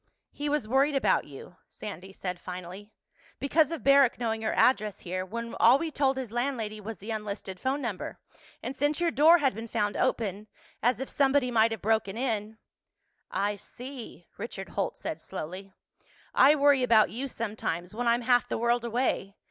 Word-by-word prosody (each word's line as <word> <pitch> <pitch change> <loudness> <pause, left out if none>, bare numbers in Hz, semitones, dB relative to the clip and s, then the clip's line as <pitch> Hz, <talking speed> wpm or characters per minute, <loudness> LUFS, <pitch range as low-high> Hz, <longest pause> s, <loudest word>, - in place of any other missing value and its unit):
"He 290 0 -3
was 295 -7 0
worried 275 +4 +3
about 270 - +2
you," 145 +5 -12
Sandy 190 -2 -8
said 180 -2 -5
finally. 185 +4 -8 0.5
"Because 300 +3 +2
of 330 -1 -5
Barrack 275 -2 +5
knowing 225 -2 -2
your 220 - -1
address 215 -5 +2
here, 185 +1 -3
when 230 +5 -6
all 240 +4 +7
we'd 320 0 -4
told 270 -2 +2
his 255 -5 -4
landlady 235 -4 -2
was 220 0 -6
the 210 +6 -7
unlisted 205 -3 -5
phone 270 +2 -1
number. 215 -6 -4 0.5
And 265 - -4
since 290 +3 0
your 345 -1 +2
door 320 +5 +7
had 275 -7 +1
been 225 +3 -7
found 210 -2 -1
open—as 220 +1 -2
if 265 - -4
somebody 275 -2 +2
might 225 -1 +4
have 225 -4 -6
broken 220 -1 +1
in—" 220 -4 -2 0.7
"I 205 +1 -1
see," 245 -4 -10
Richard 200 -3 -6
Holt 200 - -2
said 160 - -5
slowly. 185 +7 -7 0.6
"I 285 +3 +6
worry 285 -2 +4
about 230 -4 +4
you 255 +5 -3
sometimes, 205 -7 -4
when 240 +2 -2
I'm 235 +1 +3
half 245 0 +3
the - - -1
world 235 +1 +1
away. 235 -4 -1
230 Hz, 175 wpm, -28 LUFS, 205-265 Hz, 0.7 s, all